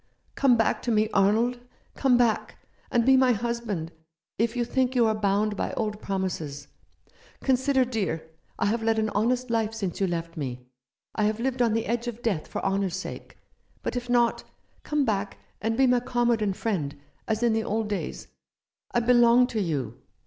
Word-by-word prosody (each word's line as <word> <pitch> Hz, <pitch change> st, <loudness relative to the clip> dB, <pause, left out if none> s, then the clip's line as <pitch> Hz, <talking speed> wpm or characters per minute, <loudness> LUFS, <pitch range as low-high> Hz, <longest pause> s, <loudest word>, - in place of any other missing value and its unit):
" -, -, -41 dB
Come 260 Hz, -4 st, +4 dB
back 225 Hz, -, +1 dB
to 240 Hz, -, -1 dB
me, 215 Hz, -1 st, +2 dB
Arnold. 225 Hz, +5 st, +3 dB, 0.3 s
Come 260 Hz, -3 st, +3 dB
back, 235 Hz, -3 st, +1 dB, 0.3 s
and 235 Hz, -1 st, +2 dB
be 265 Hz, 0 st, +6 dB
my 260 Hz, -1 st, +5 dB
husband, 225 Hz, -7 st, -3 dB, 0.5 s
if 230 Hz, +1 st, +1 dB
you 240 Hz, -1 st, 0 dB
think 260 Hz, +1 st, 0 dB
you 240 Hz, -2 st, +4 dB
are 220 Hz, -, +3 dB
bound 210 Hz, 0 st, +1 dB
by -, -, -2 dB
old 210 Hz, -1 st, -3 dB
promises. 165 Hz, -7 st, -3 dB, 0.7 s
Consider, 265 Hz, 0 st, +3 dB
dear, 200 Hz, -10 st, -2 dB, 0.3 s
I -, -, 0 dB
have 225 Hz, +3 st, +1 dB
led 225 Hz, 0 st, +1 dB
an 220 Hz, 0 st, +1 dB
honest 245 Hz, +4 st, 0 dB
life 225 Hz, -1 st, 0 dB
since 195 Hz, -4 st, -4 dB
you 195 Hz, -, +3 dB
left 170 Hz, -1 st, -4 dB
me. 125 Hz, -5 st, -5 dB, 0.5 s
I 215 Hz, -, +1 dB
have 215 Hz, +1 st, 0 dB
lived 250 Hz, +1 st, -1 dB
on 230 Hz, -3 st, +3 dB
the 225 Hz, 0 st, 0 dB
edge 235 Hz, +1 st, -2 dB
of 240 Hz, 0 st, -6 dB
death 195 Hz, -9 st, -1 dB
for -, -, -5 dB
honour's 195 Hz, -2 st, 0 dB
sake. 190 Hz, -, -7 dB, 0.5 s
But -, -, -3 dB
if 245 Hz, 0 st, -4 dB
not, 240 Hz, -1 st, +2 dB, 0.4 s
come 295 Hz, -2 st, 0 dB
back 205 Hz, -3 st, -1 dB, 0.2 s
and 225 Hz, +1 st, -1 dB
be 265 Hz, -, +5 dB
my 250 Hz, -1 st, +4 dB
comrade 240 Hz, -2 st, +1 dB
and 200 Hz, -3 st, 0 dB
friend, 150 Hz, -11 st, -2 dB, 0.3 s
as 220 Hz, +1 st, 0 dB
in 235 Hz, -2 st, +3 dB
the 225 Hz, 0 st, 0 dB
old 220 Hz, +1 st, -1 dB
days. 205 Hz, -2 st, -4 dB, 0.6 s
I 240 Hz, -, +1 dB
belong 240 Hz, 0 st, +5 dB
to 220 Hz, -3 st, -1 dB
you. 135 Hz, -, -3 dB
225 Hz, 190 wpm, -26 LUFS, 200-240 Hz, 0.7 s, be